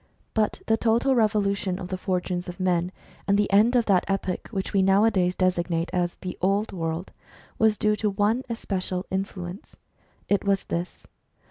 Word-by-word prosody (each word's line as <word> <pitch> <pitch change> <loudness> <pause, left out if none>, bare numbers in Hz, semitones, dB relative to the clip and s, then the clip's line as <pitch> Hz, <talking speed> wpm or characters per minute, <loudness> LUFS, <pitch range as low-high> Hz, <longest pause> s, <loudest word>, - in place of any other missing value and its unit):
But 215 -2 0
the 225 - +2
total 235 +4 +2
revolution 205 -5 +1
of 185 -1 -7
the 185 - -2
fortunes 180 -1 -2
of 175 - -8
men, 180 -1 +1 0.4
and 200 0 +3
the 205 -1 +1
end 220 +5 +5
of 240 -2 +3
that 190 -3 +3
epoch 195 -2 -2
which 195 -4 -4
we 195 - +4
nowadays 195 -2 +3
designate 175 -2 0
as 175 -1 0
the 180 -1 -6
" - - -42
old 200 +3 +1
world," 165 -1 -3 0.5
was 220 -1 +4
due 210 0 +2
to 210 - 0
one 205 +5 +1
especial 185 -5 -3
influence. 190 -1 -5 0.5
It 200 - +1
was 200 -1 +1
this. 170 +2 -5
195 Hz, 170 wpm, -25 LUFS, 180-210 Hz, 0.5 s, end